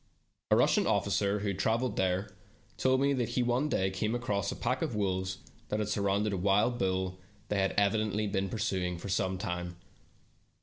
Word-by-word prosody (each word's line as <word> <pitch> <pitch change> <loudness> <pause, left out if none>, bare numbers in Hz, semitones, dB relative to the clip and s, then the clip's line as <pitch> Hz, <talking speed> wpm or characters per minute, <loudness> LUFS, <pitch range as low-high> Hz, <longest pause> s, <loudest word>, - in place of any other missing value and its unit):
A - - +5
Russian - - +3
officer 100 +1 +1
who 105 - -1
had 95 -1 -3
traveled 115 +2 +1
there, 95 +1 0 0.4
told 130 0 +2
me 140 0 +3
that 125 -4 -1
he 125 - +4
one 125 +5 +1
day 95 -8 +1
came 105 +5 -1
across 100 -5 -1
a - - -4
pack 125 +2 -1
of 150 -9 -1
wolves 95 -2 -1 0.3
that 105 - 0
had 105 -1 -1
surrounded 100 0 +1
a - - 0
wild 100 +6 +2
bull 95 -1 -1 0.3
they 105 - +1
had 95 0 +1
evidently 105 +1 +2
been 95 -1 -1
pursuing 90 -4 -1
for 100 - -7
some 95 0 0
time. 90 -1 -4
100 Hz, 185 wpm, -31 LUFS, 95-110 Hz, 0.4 s, A